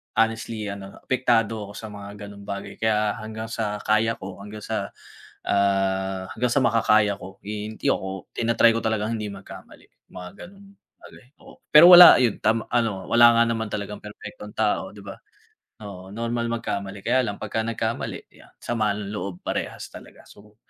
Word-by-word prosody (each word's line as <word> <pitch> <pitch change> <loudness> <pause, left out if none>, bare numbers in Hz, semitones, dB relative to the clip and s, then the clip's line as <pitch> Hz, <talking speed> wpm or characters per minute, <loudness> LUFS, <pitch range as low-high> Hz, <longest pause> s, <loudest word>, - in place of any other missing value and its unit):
honestly 115 -1 -1
ano 100 0 -9
apektado 115 -5 0
ako - - -10
sa 110 - -7
mga 100 0 -9
ganong 100 0 -12
bagay 100 0 -6
kaya 105 -1 +1
hanggang 110 +1 -7
sa 105 -2 -3
kaya 110 +1 +2
ko 95 0 -9
hanggang 105 +1 -9
sa, - - -3 0.6
ah, 95 -1 0
hanggang 125 +3 0
sa 140 - +2
makakaya, 110 -3 +3 0.3
eh 105 0 -4 0.2
hindi - - -4
ako 95 -1 -5
tina-try 115 0 +4
ko - - 0
talagang 110 +1 -1
hindi 105 - -4
magkamali 95 0 -13 0.3
mga 90 -1 -8 0.2
ganung 200 +1 -17 0.3
bagay, - - -15 0.2
oo. - - -15 0.2
Pero 165 +4 +10
wala 175 0 +11
yun 120 -4 +1
tam 110 +1 +1
ano 115 -6 -1
wala 120 0 +7
nga - - +6
naman 115 -1 -1
talagang 105 0 -4
perpektong 105 0 -10
tao, 105 -3 0
di 100 - -11
ba, 100 - -8 0.7
oo. 95 -1 -10
Normal 115 +1 -2
magkamali 100 -4 -4
kaya 125 +2 +2
lang 100 - -5
pag - - -7
nagkamali 115 0 -4
yan - - -19
sama 110 -3 0
ng 105 -1 -6
loob 100 -3 -4
parehas - - -4
talaga, - - -13
so 105 +1 -18
105 Hz, 170 wpm, -24 LUFS, 100-115 Hz, 0.7 s, wala